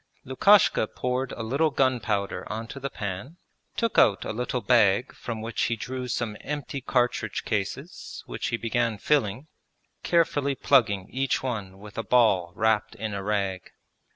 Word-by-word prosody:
Lukashka 135 Hz, -, +4 dB
poured 125 Hz, +3 st, -2 dB
a 115 Hz, -, -5 dB
little 140 Hz, +8 st, +1 dB
gunpowder 115 Hz, -9 st, 0 dB
onto 115 Hz, +5 st, -5 dB
the 140 Hz, +1 st, -3 dB
pan, 105 Hz, -, -6 dB, 0.4 s
took 230 Hz, -1 st, +2 dB
out 100 Hz, -3 st, +4 dB
a -, -, -3 dB
little 125 Hz, +2 st, -2 dB
bag 110 Hz, +1 st, +3 dB
from 110 Hz, -2 st, -6 dB
which 115 Hz, 0 st, -3 dB
he 115 Hz, -, 0 dB
drew 125 Hz, +3 st, -5 dB
some 120 Hz, -3 st, -2 dB
empty 140 Hz, -1 st, -4 dB
cartridge 120 Hz, -4 st, 0 dB
cases 115 Hz, -, -4 dB
which -, -, -4 dB
he 115 Hz, -, -1 dB
began 115 Hz, -1 st, 0 dB
filling, 130 Hz, 0 st, 0 dB, 0.6 s
carefully 145 Hz, -5 st, +1 dB
plugging 105 Hz, -10 st, +3 dB
each 135 Hz, +1 st, 0 dB
one 105 Hz, -7 st, -4 dB
with 105 Hz, +1 st, -9 dB
a -, -, -2 dB
ball 100 Hz, -8 st, +3 dB
wrapped 110 Hz, -2 st, +1 dB
in 110 Hz, -1 st, -4 dB
a 100 Hz, -, -3 dB
rag. 100 Hz, -3 st, -2 dB
115 Hz, 155 wpm, -26 LUFS, 105-130 Hz, 0.6 s, Lukashka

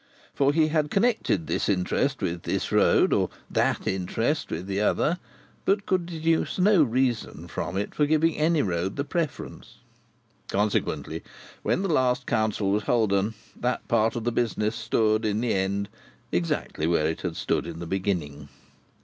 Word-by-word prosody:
For, 140 Hz, 0 st, +3 dB
he 155 Hz, +1 st, +3 dB
had 155 Hz, -1 st, +1 dB
connected 200 Hz, -, +1 dB
this -, -, -1 dB
interest 100 Hz, +7 st, 0 dB
with 85 Hz, -2 st, -2 dB
this -, -, -2 dB
road, -, -, +4 dB
or -, -, +2 dB, 0.2 s
that -, -, +1 dB
interest 115 Hz, -, -1 dB
with 85 Hz, +3 st, -4 dB
the 100 Hz, +1 st, -1 dB
other, 165 Hz, -, +1 dB, 0.4 s
but 200 Hz, +1 st, +1 dB
could 185 Hz, -2 st, 0 dB
deduce 165 Hz, -1 st, 0 dB
no 195 Hz, -1 st, +5 dB
reason 125 Hz, -3 st, 0 dB
from 95 Hz, -, -4 dB
it 100 Hz, -, -2 dB
for 150 Hz, -, +2 dB
giving 155 Hz, +1 st, +2 dB
any 155 Hz, 0 st, +2 dB
road 90 Hz, 0 st, -1 dB
the 140 Hz, -, -1 dB
preference. 165 Hz, 0 st, -4 dB, 0.7 s
Consequently, 105 Hz, +1 st, -1 dB, 0.4 s
when 190 Hz, -, 0 dB
the -, -, 0 dB
last 125 Hz, -3 st, +2 dB
council 110 Hz, -3 st, 0 dB
was 105 Hz, +1 st, +2 dB
holden, 110 Hz, -2 st, +1 dB, 0.2 s
that 125 Hz, +1 st, -2 dB
part 115 Hz, -1 st, +2 dB
of 120 Hz, -, -3 dB
the 120 Hz, -, 0 dB
business 115 Hz, -2 st, 0 dB
stood, 110 Hz, -2 st, +1 dB
in 105 Hz, -1 st, 0 dB
the 120 Hz, 0 st, 0 dB
end, 100 Hz, +1 st, 0 dB, 0.4 s
exactly 85 Hz, -2 st, -1 dB
where 85 Hz, -2 st, +2 dB
it 80 Hz, +1 st, -1 dB
had 90 Hz, -3 st, -3 dB
stood -, -, -1 dB
in 85 Hz, -1 st, -6 dB
the 85 Hz, -, -6 dB
beginning. 80 Hz, -7 st, -2 dB
110 Hz, 165 wpm, -26 LUFS, 95-150 Hz, 0.7 s, no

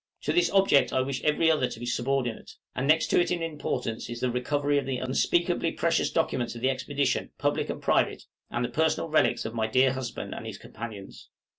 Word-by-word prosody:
To -, -, 0 dB
this 355 Hz, -, +3 dB
object 195 Hz, -8 st, +4 dB
I 130 Hz, -, +2 dB
wish 130 Hz, 0 st, -3 dB
every 155 Hz, +2 st, +3 dB
other 150 Hz, -5 st, +2 dB
to 110 Hz, -, -8 dB
be 120 Hz, -, -5 dB
subordinate; 125 Hz, 0 st, -2 dB, 0.2 s
and 130 Hz, +2 st, -2 dB
next 155 Hz, +2 st, +4 dB
to -, -, +4 dB
it 175 Hz, -, 0 dB
in 175 Hz, -2 st, -1 dB
importance 145 Hz, -8 st, -3 dB
is 120 Hz, 0 st, -5 dB
the 125 Hz, -1 st, +1 dB
recovery 145 Hz, +3 st, +1 dB
of 140 Hz, -, -6 dB
the 130 Hz, -2 st, -1 dB
unspeakably 170 Hz, +6 st, +1 dB
precious 170 Hz, 0 st, +1 dB
documents 125 Hz, -7 st, -1 dB
of 115 Hz, -, -8 dB
the 130 Hz, +2 st, +3 dB
expedition, 140 Hz, +1 st, -1 dB
public -, -, 0 dB
and -, -, -3 dB
private, -, -, +1 dB, 0.3 s
and 120 Hz, +1 st, -1 dB
the -, -, -4 dB
personal 160 Hz, +1 st, 0 dB
relics 155 Hz, -6 st, +2 dB
of 110 Hz, -, -4 dB
my 110 Hz, -1 st, 0 dB
dear 130 Hz, +3 st, +3 dB
husband 130 Hz, -2 st, -5 dB
and -, -, -7 dB
his -, -, -6 dB
companions. 105 Hz, -3 st, -9 dB
135 Hz, 210 wpm, -27 LUFS, 120-155 Hz, 0.3 s, object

